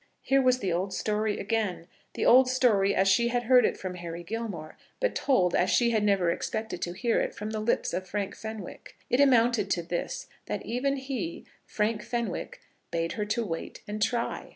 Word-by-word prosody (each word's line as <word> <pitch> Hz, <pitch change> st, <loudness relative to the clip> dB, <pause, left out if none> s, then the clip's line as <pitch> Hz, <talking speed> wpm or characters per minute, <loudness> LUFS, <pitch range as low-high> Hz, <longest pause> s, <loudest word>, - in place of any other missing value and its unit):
Here 270 Hz, 0 st, +3 dB
was 255 Hz, -1 st, +4 dB
the 190 Hz, -8 st, -1 dB
old 185 Hz, +3 st, -2 dB
story 215 Hz, 0 st, 0 dB
again, 205 Hz, -5 st, -1 dB, 0.3 s
the -, -, -1 dB
old 255 Hz, +1 st, +7 dB
story 215 Hz, -6 st, +3 dB
as 190 Hz, -, +3 dB
she 215 Hz, +5 st, +4 dB
had 240 Hz, 0 st, 0 dB
heard 250 Hz, 0 st, +6 dB
it -, -, -3 dB
from 185 Hz, -1 st, -5 dB
Harry 175 Hz, -1 st, -7 dB
Gilmore, 195 Hz, -6 st, -5 dB, 0.2 s
but -, -, +1 dB
told 185 Hz, -11 st, +2 dB
as 185 Hz, -, +2 dB
she 235 Hz, -1 st, +3 dB
had 215 Hz, -2 st, +1 dB
never 195 Hz, -4 st, +3 dB
expected 220 Hz, 0 st, -4 dB
to 175 Hz, -, -2 dB
hear 235 Hz, +5 st, +1 dB
it -, -, -3 dB
from 210 Hz, +1 st, -5 dB
the 215 Hz, -, -2 dB
lips 215 Hz, -4 st, 0 dB
of 185 Hz, +1 st, -3 dB
Frank 200 Hz, 0 st, -3 dB
Fenwick. 220 Hz, -4 st, -8 dB, 0.2 s
It 245 Hz, -, +3 dB
amounted 235 Hz, -6 st, +4 dB
to 175 Hz, -3 st, 0 dB
this; 175 Hz, +1 st, -3 dB, 0.2 s
that -, -, -4 dB
even 255 Hz, +4 st, 0 dB
he, 265 Hz, -10 st, -4 dB, 0.2 s
Frank 210 Hz, 0 st, 0 dB
Fenwick, 235 Hz, -4 st, -4 dB, 0.3 s
bade 165 Hz, 0 st, -1 dB
her 210 Hz, -1 st, -3 dB, 0.2 s
wait 165 Hz, -4 st, -6 dB
and 210 Hz, +1 st, -5 dB
try. 235 Hz, +2 st, -1 dB
215 Hz, 195 wpm, -28 LUFS, 185-240 Hz, 0.3 s, old